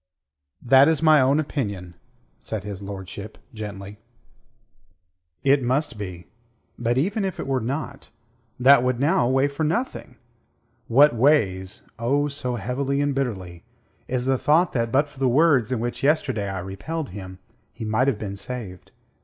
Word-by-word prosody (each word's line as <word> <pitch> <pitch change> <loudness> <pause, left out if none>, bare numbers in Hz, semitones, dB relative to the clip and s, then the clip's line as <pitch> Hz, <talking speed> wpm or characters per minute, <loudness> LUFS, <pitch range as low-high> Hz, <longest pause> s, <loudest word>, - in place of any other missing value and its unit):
"That 135 +3 +6
is 160 -1 +1
my 155 -3 +6
own 135 +3 +3
opinion," 100 - -3 0.5
said 110 -3 -5
his 100 -2 -7
lordship 100 +1 -8 0.2
gently. 105 -2 -8 1.4
"It 140 0 +4
must 130 +2 0
be. 90 -4 -7 0.5
But 120 +1 0
even 195 +9 0
if 190 -1 -3
it - - -3
were 135 -1 0
not, 140 +3 -5 0.5
that 130 +1 +7
would 125 -1 0
now 140 -4 +2
weigh 135 +2 +3
for 145 +2 -4
nothing. 165 - -2 0.7
What 140 +5 +6
weighs 110 -8 +1 0.2
oh, 140 +5 +1
so 125 -3 -3
heavily 130 +5 -2
and 145 0 +1
bitterly 95 -11 -4 0.4
is 125 -1 -2
the 130 -1 +1
thought 165 +4 +3
that 115 -2 -1
but 140 +4 +3
for 145 -2 -17
the 135 -2 +2
words 135 -4 +3
in 125 - 0
which 120 +1 -3
yesterday 135 -8 +1
I 95 - -4
repelled 135 - -5
him, 95 -1 -9 0.3
he 110 - -7
might 110 +5 +1
have 135 -6 +1
been 100 -2 -5
saved. 100 -4 -7
125 Hz, 155 wpm, -23 LUFS, 105-140 Hz, 1.4 s, that